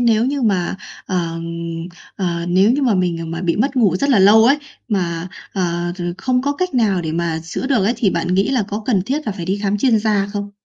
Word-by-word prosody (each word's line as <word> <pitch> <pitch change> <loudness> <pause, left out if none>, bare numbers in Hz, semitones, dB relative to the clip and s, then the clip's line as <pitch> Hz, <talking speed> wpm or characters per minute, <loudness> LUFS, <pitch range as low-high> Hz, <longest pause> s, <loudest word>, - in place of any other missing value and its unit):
nếu 230 -1 +3
như 275 +1 -1
mà, 190 -5 0 0.3
ờm, 165 -3 -2 0.7
ờ, 170 -3 -2
nếu 190 +4 +4
như 285 +3 0
mà 245 -5 +3
mình, 175 -3 0
à, - - -4
mà 165 +1 -5
bị 170 -2 0
mất 265 +6 0
ngủ 200 -8 +3
rất 280 +8 0
là 250 - +5
lâu 210 +3 +7
ấy, 275 +5 +4 0.3
mà, 175 -4 -1 0.2
ờ, 175 -2 -1
r - - -7 0.2
không 255 +3 0
có 285 +1 0
cách 365 +1 -3
nào 210 -7 +2
để 160 -1 -3
mà 165 -1 -1
chữa 165 +10 -4
được 255 -8 +2
ấy 220 - +2
thì 205 -6 +2
bạn 180 - -1
nghĩ 195 +2 +2
là 255 -4 +2
có 210 +2 -4
cần 205 -8 +2
thiết 280 +9 -3
là 215 - -1
phải 185 -3 -6
đi 190 +3 -1
khám 205 0 0
chuyên 230 0 +3
gia 210 -2 +1
không? 205 -1 -4
200 Hz, 250 wpm, -19 LUFS, 175-240 Hz, 0.7 s, lâu